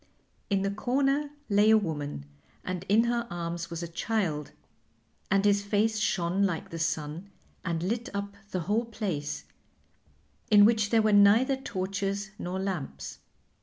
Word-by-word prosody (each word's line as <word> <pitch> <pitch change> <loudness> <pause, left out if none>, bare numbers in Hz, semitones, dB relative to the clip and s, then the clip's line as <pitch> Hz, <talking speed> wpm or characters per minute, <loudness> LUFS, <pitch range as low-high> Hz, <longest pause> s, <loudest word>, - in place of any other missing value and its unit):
In 195 -1 +1
the 195 - 0
corner 275 +7 +1 0.2
lay 205 0 +4
a 220 - +7
woman, 145 - -3 0.4
and 185 -1 -4
in 215 +3 +5
her 235 0 0
arms 170 0 -4
was 170 0 -5
a - - -3
child 165 -4 -2 0.8
and 195 +1 +3
his 200 0 +4
face 215 +2 +1
shone 185 -2 0
like 180 -5 -1
the 165 - -5
sun 160 +3 -2 0.3
and 170 -1 -2
lit 230 +5 -2
up 200 0 -4
the 185 - -2
whole 210 +7 0
place, 190 -10 -3 1.1
in 205 -1 +8
which 215 -2 +3
there 225 -1 +4
were 215 -1 +3
neither 215 +7 +6
torches 195 -4 -3
nor 180 +2 -3
lamps. 150 - -4
200 Hz, 150 wpm, -28 LUFS, 170-215 Hz, 1.1 s, in